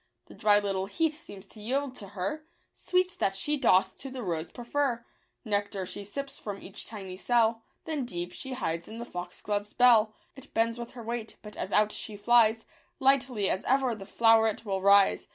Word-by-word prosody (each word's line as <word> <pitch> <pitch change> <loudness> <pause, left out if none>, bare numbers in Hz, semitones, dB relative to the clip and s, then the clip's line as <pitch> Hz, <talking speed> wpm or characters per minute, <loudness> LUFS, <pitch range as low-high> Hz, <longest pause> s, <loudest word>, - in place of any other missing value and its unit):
The - - -14
dry 210 -1 +4
little 195 -2 -1
heath 320 +7 0
seems 200 -1 -10
to 210 +2 -13
yield 265 +4 -1
to 200 - -8
her 200 +13 -2 0.3
Sweets 365 0 0
that 195 - +1
she 295 +10 0
doth 230 -9 +3
to 270 - -7
the 260 -2 -6
rose 165 -3 -3
prefer; 245 -1 -2 0.4
Nectar 205 -2 -1
she 200 - -6
sips 275 +7 -6
from 200 -2 -6
each 195 - -8
tiny 195 -4 -7
cell. 225 +2 +2 0.2
Then 300 -5 -2
deep 175 -4 -4
she 265 - -6
hides 170 -8 -3
in 220 - -8
the 235 - -5
foxglove's 205 +2 -4
bell. 230 -3 +5 0.2
It 270 0 -14
bends 230 +1 +1
with 235 0 -7
her 240 -2 -9
weight, 230 -1 -5
but, 210 -1 -10
as 190 - -4
out 210 0 +4
she 210 -1 -5
flies, 225 +1 +4 0.3
Lightly 265 -6 +3
as 190 - 0
ever 265 -2 +2
the 195 -3 -9
flow'ret 225 0 +3
will 195 -2 -2
rise. 200 0 +5
220 Hz, 190 wpm, -29 LUFS, 200-250 Hz, 0.4 s, bell